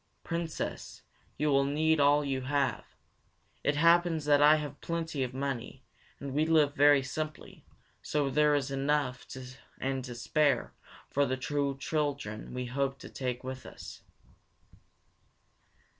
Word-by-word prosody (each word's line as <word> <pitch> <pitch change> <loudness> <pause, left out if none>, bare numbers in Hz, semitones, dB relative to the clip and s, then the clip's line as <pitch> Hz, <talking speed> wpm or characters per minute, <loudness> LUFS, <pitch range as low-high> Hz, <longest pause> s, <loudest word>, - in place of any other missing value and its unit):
"Princess, 165 -1 -4 0.3
you 150 +2 +1
will 140 0 +4
need 155 +3 +2
all 145 +1 +4
you 135 -1 -1
have. 140 +1 -1 0.7
It 145 - +2
happens 170 0 +4
that 145 -1 +4
I 150 +1 +8
have 145 -2 -5
plenty 165 -4 -3
of 130 -1 -2
money, 135 -1 -4 0.4
and 140 -1 -6
we 150 +2 +2
live 155 -3 +3
very 145 -1 +5
simply, 155 +3 -6 0.4
so 145 -2 0
there 150 +1 +4
is 140 -1 -1
enough 135 -2 -1 0.5
and 135 0 -2
to 120 -2 -7
spare 140 +1 +1 0.4
for 140 0 +2
the 130 - -1
two 140 0 -1
children 140 -7 -3
we 125 0 -3
hope 135 +2 -1
to - - -11
take 125 -1 -4
with 130 +1 -6
us." - - -10
140 Hz, 140 wpm, -30 LUFS, 135-150 Hz, 0.7 s, I